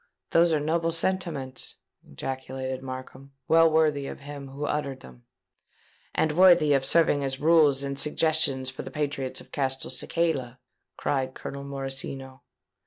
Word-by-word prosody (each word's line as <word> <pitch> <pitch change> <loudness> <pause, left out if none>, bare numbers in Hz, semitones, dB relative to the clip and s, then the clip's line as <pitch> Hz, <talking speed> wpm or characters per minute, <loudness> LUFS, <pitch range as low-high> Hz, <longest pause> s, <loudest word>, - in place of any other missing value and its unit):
_'" - - -38 0.3
"Those 170 0 +5
were 155 - +2
noble 165 +3 0
sentiments!" 165 -7 -3 0.3
ejaculated 130 - -5
Markham: 130 +1 -8
"well 165 0 +6
worthy 155 -3 +2
of - - -8
him 140 -1 -8
who 140 +2 -5
uttered 140 -3 -2
them." 60 -1 -15 0.9
"And 160 - +2
worthy 175 -3 +6
of 135 -1 +2
serving 145 0 +3
as 135 0 -2
rules 150 -4 +4
and 140 0 -4
suggestions 150 -4 +1
for 130 - -7
the - - -7
patriots 145 -3 -3
of - - -17
Castelcicala!" 135 0 -1 0.4
cried 130 -2 -1
Colonel 140 0 -7
Morosino. 135 -1 -5
140 Hz, 140 wpm, -27 LUFS, 130-160 Hz, 0.9 s, well